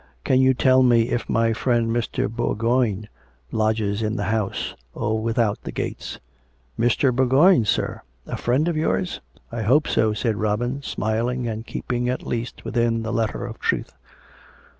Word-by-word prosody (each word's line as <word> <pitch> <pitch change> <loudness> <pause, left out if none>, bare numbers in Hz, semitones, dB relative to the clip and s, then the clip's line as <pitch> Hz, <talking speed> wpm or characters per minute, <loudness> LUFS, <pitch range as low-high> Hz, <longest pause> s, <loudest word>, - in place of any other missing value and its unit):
" - - -37
Can 130 - +3
you 130 0 +4
tell 130 +1 +4
me 120 -2 +4
if 120 - -2
my 115 0 +2
friend 120 0 +1
Mr. 115 -3 -1
Bourgoign 115 -1 0 0.4
lodges 110 -1 0
in 110 0 -1
the 105 - -2
house, 110 -3 -2 0.2
or 110 +1 -1
without 115 -2 0
the - - -6
gates? - - -5 0.2
" 65 0 -38
" 65 +8 -24
Mr. 120 +2 +3
Bourgoign, 130 - +5
sir? 100 - -1 0.2
A - - -4
friend 130 +7 +1
of 170 - 0
yours? 170 +3 -1
" - - -29
" - - -35
I 115 -1 -3
hope 130 +8 +3
so," 110 -1 +2
said 110 0 -1
Robin, 120 +6 -1
smiling, 120 0 -1
and 110 0 -5
keeping 125 0 -2
at 125 - -3
least 120 0 -4
within 115 -1 0
the 110 +1 -3
letter 115 +1 -1
of 115 -2 -8
truth. - - -1
115 Hz, 180 wpm, -23 LUFS, 110-125 Hz, 0.4 s, Bourgoign